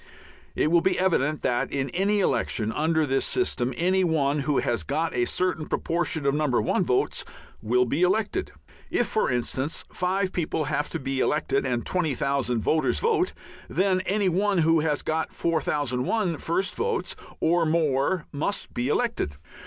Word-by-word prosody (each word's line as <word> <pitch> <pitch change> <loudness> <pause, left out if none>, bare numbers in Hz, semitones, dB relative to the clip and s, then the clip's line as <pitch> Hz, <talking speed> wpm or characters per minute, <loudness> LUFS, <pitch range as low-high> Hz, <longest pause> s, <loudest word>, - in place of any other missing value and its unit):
It 155 - +1
will 170 -1 +5
be 185 +1 +1
evident 155 -5 +1
that, 120 -1 0
in 135 -2 -2
any 200 +3 +1
election 115 - 0
under 160 +2 +1
this 135 -1 +1
system, 130 - 0
any 185 +2 +2
one 150 -4 +1
who 140 0 0
has 115 -5 0
got 160 - -1
a 120 - +2
certain 180 -2 -1
proportion 165 -3 -1
of 140 - +3
No. 150 +1 +1
1 125 -3 +1
votes - - 0 0.4
will 125 +3 +2
be 140 +7 -1
elected. 210 - +1 0.4
If, 240 - +1
for 220 - 0
instance, 130 +4 -2
five 185 +1 0
people 160 -2 -1
have 145 0 -1
to - - -4
be 135 0 -2
elected 140 -1 +1
and 120 -2 -1
20,000 140 -7 0
voters 155 +8 +1
vote, 435 -5 +1 0.4
then 185 -1 +2
any 200 0 +1
one 195 +3 +1
who 165 0 +4
has 150 -2 0
got 160 0 -1
4001 155 - 0
first 185 +6 -1
votes 460 0 -2 0.2
or 165 0 +2
more 155 +1 +1
must 155 +8 -2
be 120 +1 -1
elected. 150 - -1
160 Hz, 160 wpm, -26 LUFS, 135-185 Hz, 0.4 s, will